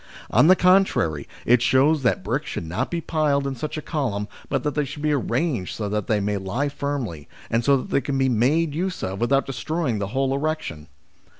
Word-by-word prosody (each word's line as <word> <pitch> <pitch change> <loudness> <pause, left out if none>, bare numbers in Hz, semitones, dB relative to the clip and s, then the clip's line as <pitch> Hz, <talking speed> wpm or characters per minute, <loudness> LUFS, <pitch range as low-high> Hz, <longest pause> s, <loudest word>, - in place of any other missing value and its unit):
On - - +5
the 185 - +8
contrary, 180 - +3 0.2
it 120 0 +4
shows 140 +5 +3
that 120 -7 +1
bricks 125 +9 -2
should - - -4
not 80 +2 -2
be 170 -1 -2
piled 150 -4 +1
in 135 - -2
such 155 +5 -5
a 155 - -5
column, 115 -10 -2 0.2
but - - -1
that 150 - -1
they 150 - +1
should 145 +2 -7
be 155 - +2
arranged 130 - -1
so 105 - -3
that 105 -1 -2
they 110 -2 +2
may 100 0 -1
lie 105 +10 -2
firmly, 135 - -4 0.2
and 115 +1 +2
so 140 +3 +4
that 130 - -6
they 140 - +2
can 140 -1 -2
be 135 0 +2
made 140 +7 +2
use 180 +4 -3
of 95 +1 -3
without 135 +3 +2
destroying 135 -2 -2
the 100 - -2
whole 135 +5 0
erection. 140 - -3
135 Hz, 215 wpm, -23 LUFS, 105-150 Hz, 0.2 s, the